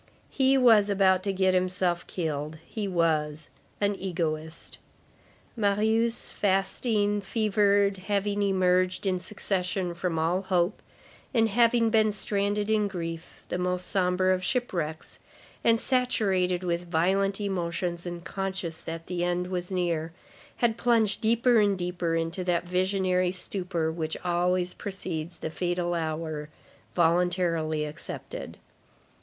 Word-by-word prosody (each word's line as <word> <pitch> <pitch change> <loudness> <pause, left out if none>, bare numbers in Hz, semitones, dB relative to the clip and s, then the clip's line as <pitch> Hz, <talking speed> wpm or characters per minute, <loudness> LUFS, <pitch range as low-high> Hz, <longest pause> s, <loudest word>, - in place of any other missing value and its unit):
He 270 0 +3
was 225 -5 +6
about 190 -2 +3
to 195 +1 -1
get 190 -1 +2
himself 180 -1 0
killed. 155 -2 -3
He 210 -3 -4
was 155 -4 0 0.3
"an 205 0 +2
egoist." 160 -3 -3 0.8
Marius, 220 +2 +2
fasting, 205 +1 +1
fevered, 200 -1 +2
having 205 +1 -1
emerged 185 -1 +2
in 185 -2 +1
succession 185 -1 -2
from 170 -1 -2
all 170 +4 +1
hope, 185 0 0 0.5
and 225 -1 +4
having 230 +1 +3
been 215 -1 +4
stranded 205 +1 -1
in 210 -1 +2
grief, 165 -4 -6
the 180 - -2
most 180 0 -1
sombre 185 0 +2
of 185 0 -2
shipwrecks, 175 -9 -2 0.4
and 230 -1 +4
saturated 195 -9 +1
with 175 0 -2
violent 195 +4 +1
emotions 175 -3 -2
and 175 -1 -6
conscious 190 -4 -4
that 165 0 -6
the 175 -1 -2
end 175 +1 -1
was 180 -1 -3
near, 170 -3 -1 0.4
had 230 -2 +1
plunged 225 -4 +2
deeper 235 +1 +4
and 200 -2 +3
deeper 175 -2 -1
into 165 +3 -1
that 175 -1 0
visionary 185 0 +1
stupor 180 -3 -2
which 160 -1 -3
always 180 +1 +1
precedes 175 -4 -5
the 160 - -5
fatal 175 +1 -1
hour 155 -2 -3 0.5
voluntarily 170 -2 +1
accepted. 150 0 -7
185 Hz, 125 wpm, -27 LUFS, 170-200 Hz, 0.8 s, was